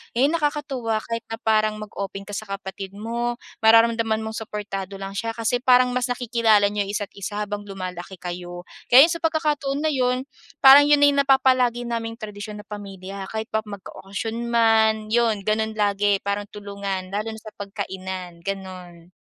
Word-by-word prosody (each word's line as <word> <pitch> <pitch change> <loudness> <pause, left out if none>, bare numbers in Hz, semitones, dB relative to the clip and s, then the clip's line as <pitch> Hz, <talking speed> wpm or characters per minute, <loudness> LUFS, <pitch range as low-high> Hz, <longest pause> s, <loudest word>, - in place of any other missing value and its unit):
ngayon 280 +7 +3
nakakatuwa 270 -7 -1
kahit 230 0 -4
na 225 - -3
parang 215 -1 +2
mag-open 200 -1 -6
ka 205 - -8
sa 215 - -5
kapatid 195 0 -6
mo 235 +3 -2 0.3
mararamdaman 225 0 +5
mong 220 0 -5
suportado 200 -3 -5
lang 195 0 -5
siya 230 +2 -2
kasi 230 +2 0
parang 250 -1 +5
mas 250 -1 0
nakikilala 230 -4 +3
niyo 205 -1 -1
isa't 205 -1 -3
isa 205 +2 -3
habang 205 0 -5
lumalaki 185 -1 -6
kayo. 175 0 -7 0.3
Kaya 255 +3 +10
'yon, 335 - -3
sa 335 - -5
pagkakataon 300 -4 0
na 315 - +2
yun, 255 -2 +1 0.4
parang 275 +2 +10
yun 295 -1 +5
na 290 - +8
yung 280 0 +1
napapalagi 255 -3 +3
naming 230 -1 -3
tradisyon 210 -1 -7
na - - -25
pamilya 195 -1 -7
kahit 220 0 -3
pa 220 - +1
magka-okasyon 200 +2 -6
man, 225 -2 +4 0.2
yun 230 -3 +2
gano'n 220 +1 0
lagi 205 -1 +2
parang 200 +1 -2
tulungan 200 -2 -5
lalo 210 +2 -2
na 220 - -8
sa 215 - -10
'pag 200 -1 -8
kainan, 185 -2 -7
gano'n. 185 -3 -7
215 Hz, 170 wpm, -23 LUFS, 195-235 Hz, 0.4 s, Kaya